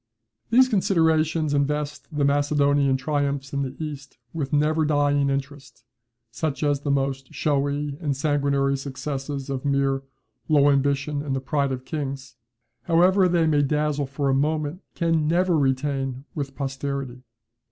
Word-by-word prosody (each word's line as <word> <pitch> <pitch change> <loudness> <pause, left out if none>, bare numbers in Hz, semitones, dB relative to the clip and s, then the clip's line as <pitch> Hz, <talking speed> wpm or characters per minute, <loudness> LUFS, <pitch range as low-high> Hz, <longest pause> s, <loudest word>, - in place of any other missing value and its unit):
] 110 - -51
These 255 +3 +6
considerations 160 - +2
invest 150 +1 -1
the 145 -2 0
Macedonian 145 -1 +2
triumphs 140 0 -2
in 140 - 0
the 135 -1 -4
East 145 -4 -7 0.2
with 145 -5 -3
never 155 +2 +2
dying 145 -2 +2
interest, 140 -2 -5 0.5
such 155 +4 -3
as 145 -1 +2
the 145 - -4
most 135 -1 -1
showy 145 0 -1
and 145 -5 -1
sanguinary 140 -1 +1
successes 135 0 -5
of 135 -2 -4
mere 140 -1 +1 0.5
"low 145 -2 +5
ambition 140 +1 0
and 140 -2 -2
the - - -1
pride 140 0 -1
of 130 0 -5
kings," 135 -3 -5 0.5
however 180 +3 +4
they 170 -2 +2
may 150 -2 +3
dazzle 150 0 0
for 140 +1 -2
a 135 - +3
moment, 155 +4 0
can 165 -3 +1
never 175 +2 +2
retain 135 -1 -1
with 140 -2 -5
posterity. 135 -2 -4
145 Hz, 145 wpm, -24 LUFS, 135-150 Hz, 0.5 s, These